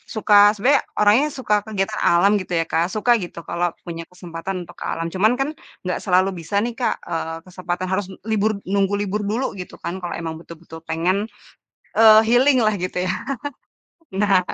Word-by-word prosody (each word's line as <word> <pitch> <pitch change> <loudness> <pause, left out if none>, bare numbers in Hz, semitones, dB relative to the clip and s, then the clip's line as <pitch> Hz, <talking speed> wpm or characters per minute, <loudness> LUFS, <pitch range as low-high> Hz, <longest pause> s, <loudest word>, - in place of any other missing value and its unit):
suka 210 -1 +3 0.2
sebenernya 270 +7 +3 0.2
orangnya 215 +8 +5
suka 210 -4 +1
kegiatan 215 0 -2
alam 175 +4 +4
gitu 180 - -7
ya 165 - 0
Kak, 165 +1 +2
suka 240 +3 +2
gitu 170 - -8
kalau 175 +1 0 0.2
punya 165 -1 -6
kesempatan 180 +1 -6
untuk - - -15
ke - - -4
alam, 165 0 -3
cuman 215 +6 +3
kan, 270 +2 0 0.4
enggak 180 - -1
selalu 185 0 +3
bisa 185 +5 -6
nih 240 0 -2
Kak, 245 - +1
eee, 165 0 -3
kesempatan 180 0 -4
harus 190 0 -1 0.2
libur 215 0 +2 0.2
nunggu 200 0 +2
libur 205 +1 -2
dulu 245 +5 0
gitu 180 - -8
kan 180 +2 -3
kalau 175 - -4
emang 160 -1 -4
betul-betul 165 -1 -12
pengen, 170 +4 +1 0.8
eee, 220 -1 +9
healing 255 +2 +4
lah 215 - +2
gitu 180 0 -3
ya. - - +1 1.1
Nah, 200 -3 +4
190 Hz, 180 wpm, -21 LUFS, 175-215 Hz, 1.1 s, eee